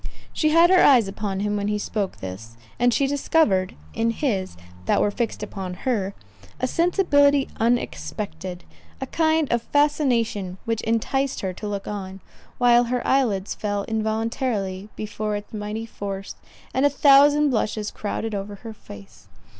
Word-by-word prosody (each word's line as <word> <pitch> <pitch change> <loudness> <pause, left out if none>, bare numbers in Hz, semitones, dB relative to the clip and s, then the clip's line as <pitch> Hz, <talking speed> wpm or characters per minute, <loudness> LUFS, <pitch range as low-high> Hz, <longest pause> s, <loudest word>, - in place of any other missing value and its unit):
She 310 - +2
had 335 +3 +5
her 370 - +6
eyes 245 -7 +6
upon 195 -1 -3
him 210 0 0
when 200 0 -1
he 210 0 0
spoke 205 -2 -3
this, 105 +5 -8 0.2
and 245 +1 +4
she 275 - +2
discovered 270 - +1 0.2
in 230 0 +1
his, 210 - -2 0.3
that - - +3
were 205 - +2
fixed 230 -1 -3
upon 190 -3 -5
her, 200 -2 -2 0.4
a - - +1
sensibility 285 -3 +3
unexpected—a 180 - -3
kind 320 -2 +1
of 235 - +1
fascination 235 -10 +1
which 225 -1 -1
enticed 255 +5 0
her 190 -1 -2
to 210 - -7
look 200 -1 -4
on, 195 -2 -5 0.4
while 245 -1 +5
her 245 +1 -2
eyelids 220 -8 +1
fell 205 -1 -2
involuntarily 220 -2 -2
before 215 0 -3
its 205 +2 -7
mighty 215 +1 -4
force, 195 -3 -6 0.4
and 260 - +1
a 285 - +6
thousand 285 +1 +5
blushes 215 -2 -1
crowded 220 +1 -4
over 205 0 -4
her 225 +2 -9
face. 100 - -14
220 Hz, 150 wpm, -23 LUFS, 195-260 Hz, 0.4 s, her